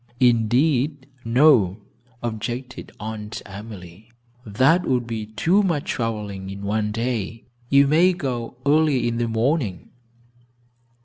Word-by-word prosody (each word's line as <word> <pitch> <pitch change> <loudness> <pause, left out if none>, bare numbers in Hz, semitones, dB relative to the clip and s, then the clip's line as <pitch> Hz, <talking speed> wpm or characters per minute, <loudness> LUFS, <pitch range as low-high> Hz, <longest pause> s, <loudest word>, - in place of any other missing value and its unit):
"Indeed, 130 +4 +2 0.2
no," 115 - +4 0.5
objected 120 +3 -5
Aunt 105 0 -6
Emily, 100 0 -11 0.3
"that 130 - +3
would 125 -2 +1
be 110 -2 -5
too 160 - +2
much 170 -8 -1
traveling 105 -5 -4
in 100 +1 -7
one 105 +1 -1
day. 115 -1 -3 0.3
You 140 0 +6
may 165 +6 +4
go 125 -7 -4
early 145 -3 +3
in 115 0 -1
the 120 0 0
morning." 115 - -1
115 Hz, 115 wpm, -23 LUFS, 105-140 Hz, 0.5 s, You